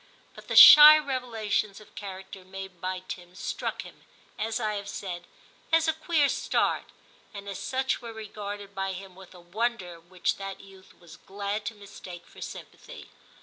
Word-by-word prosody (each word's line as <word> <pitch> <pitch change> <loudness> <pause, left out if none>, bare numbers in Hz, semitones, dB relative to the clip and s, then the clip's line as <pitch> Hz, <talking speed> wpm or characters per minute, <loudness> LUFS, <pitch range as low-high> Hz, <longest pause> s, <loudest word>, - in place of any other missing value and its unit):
But - - -14
the - - -3
shy 300 +1 +11
revelations 230 -8 -2
of 215 - -18
character 190 -1 -9
made 190 -1 -10
by 185 0 -4
Tim 180 0 -9
struck - - -4
him, - - -15 0.4
as 225 +2 -2
I 215 -2 -1
have 200 -1 -6
said, 175 -4 -6 0.5
as 325 0 +3
a 320 - +2
'queer 315 -2 +1
start,' - - -1 0.4
and 200 0 -9
as 200 - -6
such 265 0 -2
were 235 -1 -8
regarded 205 -2 -8
by 195 -1 -3
him 190 0 -10
with 190 0 -15
a - - -13
wonder 180 -1 -3
which 175 +2 -3
that 195 -1 -7
youth 190 -1 -17
was 170 -3 -15
glad 200 +2 -5
to 225 - -5
mistake 185 -3 -11
for - - -16
sympathy. - - -10
200 Hz, 170 wpm, -27 LUFS, 185-225 Hz, 0.5 s, shy